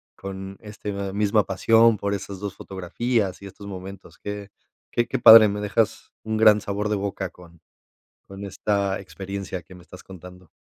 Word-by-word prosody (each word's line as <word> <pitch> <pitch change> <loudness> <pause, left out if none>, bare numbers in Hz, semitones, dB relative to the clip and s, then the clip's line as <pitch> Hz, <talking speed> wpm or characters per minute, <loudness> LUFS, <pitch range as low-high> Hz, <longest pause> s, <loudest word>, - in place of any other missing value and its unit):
con 95 0 -8
este 105 -1 -7 0.2
misma 105 0 +2
pasión 115 +4 +4
por 100 +1 -2
esas 100 -1 -6
2 100 -1 -5
fotografías 95 +2 -2
y 100 - -8
estos 100 +1 -12
momentos 95 0 -9
que 105 -1 -6 0.4
que 120 - 0
que 130 - -2
padre, 110 -2 +10
me 105 0 -3
dejas 105 +1 -1
un 110 0 -3
gran 110 -1 +6
sabor 105 +1 -3
de 105 - +1
boca 100 -1 -3
con 85 -2 -17 0.7
con 100 +1 -9
esta 100 0 -1
experiencia 95 -1 -6
que 95 - -15
me 90 - -14
estás 90 +1 -13
contando. 90 -1 -13
100 Hz, 170 wpm, -24 LUFS, 95-105 Hz, 0.7 s, padre